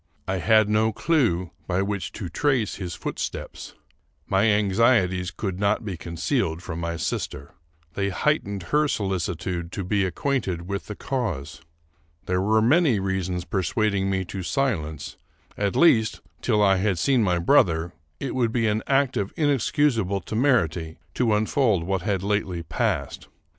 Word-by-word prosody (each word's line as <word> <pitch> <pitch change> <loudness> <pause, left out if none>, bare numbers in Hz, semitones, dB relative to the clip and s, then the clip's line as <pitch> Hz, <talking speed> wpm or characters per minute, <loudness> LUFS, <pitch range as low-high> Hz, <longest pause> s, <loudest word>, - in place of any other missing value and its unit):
I 95 - 0
had 110 +5 +4
no 110 +1 +2
clew 110 - +1 0.2
by 95 +1 +1
which 100 -4 -3
to 95 - -5
trace 125 - 0
his 90 -5 -5
footsteps. - - -5 0.5
My 95 +2 +2
anxieties 105 -3 +3
could 95 -2 -4
not 105 +2 +1
be 100 -4 -3
concealed 85 - -2
from 85 -2 -5
my 85 0 -3
sister. 70 -2 -4 0.4
They 100 +1 -1
heightened 100 - 0
her 150 0 +4
solicitude 90 - -2
to 100 - -3
be 100 +2 +1
acquainted 95 -4 -2
with 100 0 -4
the 105 - -6
cause. 90 - -3 0.6
There 90 0 0
were 110 +2 +3
many 135 - +4
reasons 95 -2 -2
persuading 95 +2 0
me 95 -1 -1
to 95 +2 -6
silence; 85 - -2 0.4
at 100 -1 -1
least, 115 -10 +4 0.2
till 105 -4 +2
I 95 -1 +4
had 95 -1 +1
seen 130 +6 +2
my 90 -4 +2
brother, 85 0 +3 0.3
it 135 - -3
would 120 -3 +1
be 115 -1 +1
an 105 0 +1
act 135 -2 +2
of 100 -2 -2
inexcusable 135 - +1
temerity 100 - 0 0.2
to 115 -4 +2
unfold 110 - +2
what 95 +1 -1
had 95 -1 -1
lately 100 -4 -1
passed. - - -2
100 Hz, 150 wpm, -24 LUFS, 90-115 Hz, 0.6 s, had